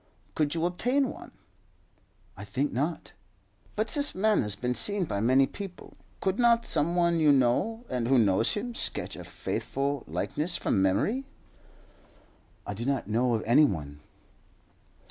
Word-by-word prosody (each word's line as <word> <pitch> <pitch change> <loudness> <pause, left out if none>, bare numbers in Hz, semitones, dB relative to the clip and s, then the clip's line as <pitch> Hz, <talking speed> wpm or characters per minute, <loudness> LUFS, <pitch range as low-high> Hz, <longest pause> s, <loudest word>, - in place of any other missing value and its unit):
"Could 150 0 0
you 165 0 0
obtain 250 +10 +1
one?" - - -11 1.1
"I 100 - -9
think 130 +8 -2
not." 150 +7 -2 0.6
"But 215 +1 -1
this 290 -1 0
man 215 +3 +3
has 105 -2 -1
been 125 +4 -2
seen 200 - 0
by 100 - -3
many 130 +5 +4
people. 195 +3 -9 0.3
Could 190 +3 0
not 235 -1 +4
some 170 +4 0
one 170 -1 +2
you 155 -2 +5
know, 145 - +1
and 125 -2 -2
who 135 +1 +4
knows 110 0 +2
him, 235 +3 -4
sketch - - -2
a - - -8
faithful 140 +1 -3
likeness 165 +4 -1
from 95 - 0
memory?" 200 - +1 1.4
"I 105 - -4
do 110 +4 -6
not 135 -4 -1
know 120 +2 +2
of 110 - -2
any 125 +7 +6
one." 75 - -4
145 Hz, 155 wpm, -28 LUFS, -, 1.4 s, any